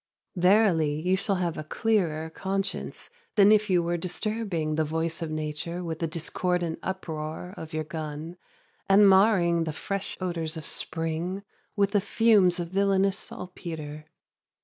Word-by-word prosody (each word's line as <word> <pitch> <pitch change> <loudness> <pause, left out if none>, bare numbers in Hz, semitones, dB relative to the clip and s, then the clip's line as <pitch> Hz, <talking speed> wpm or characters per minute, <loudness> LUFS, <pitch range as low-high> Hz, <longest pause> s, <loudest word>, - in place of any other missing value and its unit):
Verily, 180 -5 +3
you 180 +4 +2
shall 200 +1 0
have 175 -3 -2
a - - -4
clearer 160 -4 0
conscience 195 +3 -3 0.2
than 205 0 +7
if 215 -1 +4
you 180 -2 +3
were 175 +1 0
disturbing 185 -3 -2
the 155 +1 +1
voice 160 +2 -2
of 165 - -3
nature 155 +3 -3
with 165 -2 -4
the 165 - 0
discordant 170 +1 -1
uproar 165 -1 -5
of 160 -5 -8
your 155 0 -2
gun, 155 +1 -6 0.5
and 200 +1 +7
marring 190 -4 +5
the 160 - -2
fresh 195 +5 -4
odors 170 -4 -2
of 155 - -7
spring 165 +4 -3 0.3
with 200 -1 +2
the 205 -1 +3
fumes 205 -4 +4
of 170 -1 -3
villainous 195 0 +2
saltpetre. 155 -4 -7
175 Hz, 150 wpm, -27 LUFS, 160-195 Hz, 0.5 s, than